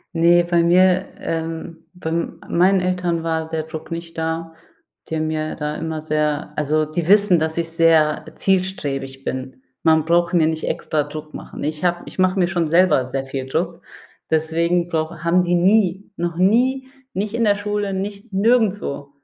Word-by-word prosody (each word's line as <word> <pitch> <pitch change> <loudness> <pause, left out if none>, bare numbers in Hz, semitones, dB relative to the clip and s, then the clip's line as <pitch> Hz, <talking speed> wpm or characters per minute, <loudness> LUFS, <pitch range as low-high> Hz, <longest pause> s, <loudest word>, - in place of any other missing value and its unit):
Ne, 170 +1 +5
bei 170 -1 +2
mir 185 +2 +4
ähm, 165 0 -5
bei 180 -3 -5
meinen 175 +3 +1
Eltern 180 -2 -1
war 160 -1 -2
der 160 -1 -2
Druck 160 0 -9
nicht 165 0 -6
da, 165 0 -3 0.6
die 160 - -2
haben 155 0 -1
mir 155 0 -2
da 150 -1 -3
immer 160 -1 -4
sehr 150 -1 -1
also 155 +1 +1
die 155 +2 -3
wissen, 200 -2 +5
dass 160 +1 -2
ich 165 -1 -1
sehr 165 -2 +3
zielstrebig 145 -9 -1
bin. 130 0 -5 0.2
Man 160 -1 +4
braucht 170 +2 +2
mir 165 -3 +4
nicht 160 0 -2
extra 150 -1 -1
Druck 155 +1 -9
machen. - - -8
Ich 150 +2 -3
habe 175 -1 +1
ich - - -11
mache 185 +1 +2
mir 175 - +3
schon 170 -2 0
selber 170 -5 +3
sehr 135 +1 -3
viel 135 -1 -5
Druck, 165 +5 -2 0.5
deswegen 165 +2 +1
brauche 160 -1 -3
haben 175 +2 +3
die 175 0 +1
nie, 190 +1 +2
noch 170 -1 -3
nie, 250 +8 +2 0.3
nicht 205 +2 -3
in 235 0 0
der 205 -2 +4
Schule, 205 -1 -2
nicht 200 +3 -5
nirgendswo 205 - +1
170 Hz, 175 wpm, -21 LUFS, 155-185 Hz, 0.6 s, Ne